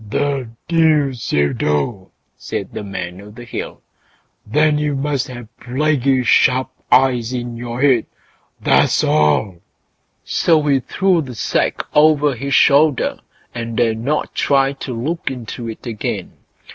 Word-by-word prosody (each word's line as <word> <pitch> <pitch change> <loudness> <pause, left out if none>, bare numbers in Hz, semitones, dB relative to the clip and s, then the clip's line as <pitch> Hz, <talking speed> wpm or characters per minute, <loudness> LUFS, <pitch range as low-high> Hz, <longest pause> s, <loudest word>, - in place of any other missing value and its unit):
"The 140 0 -1 0.2
deuce 155 -7 +1
you 70 0 +2
do!" 85 +7 -1 0.3
said - - -6
the - - -5
Man 95 -2 -6
o' 105 - -12
the 110 +3 -11
Hill; 120 - -7 0.6
"then 150 +5 +2
you 150 -1 -1
must 140 -1 -1
have 120 -2 -10
plaguy 135 0 +1
sharp 130 +2 +3 0.2
eyes 125 -2 +3
in 120 -1 -4
your 120 +2 -4
head, 130 -5 +3 0.5
that's - - +3
all!" 75 +5 +2 0.7
So 165 -2 +2
he 140 -2 +2
threw 180 +6 +1
the 130 -5 -8
sack - - -1
over 150 -1 +4
his 135 +3 -2
shoulder, 145 -1 +3 0.3
and 115 -1 -5
dared 115 -2 +1
not 145 +6 -2
try 135 -1 +2
to 135 -1 -7
look 165 +7 -2
into 120 -2 -6
it 110 - -9
again. 115 -3 -4
130 Hz, 140 wpm, -18 LUFS, 115-145 Hz, 0.7 s, over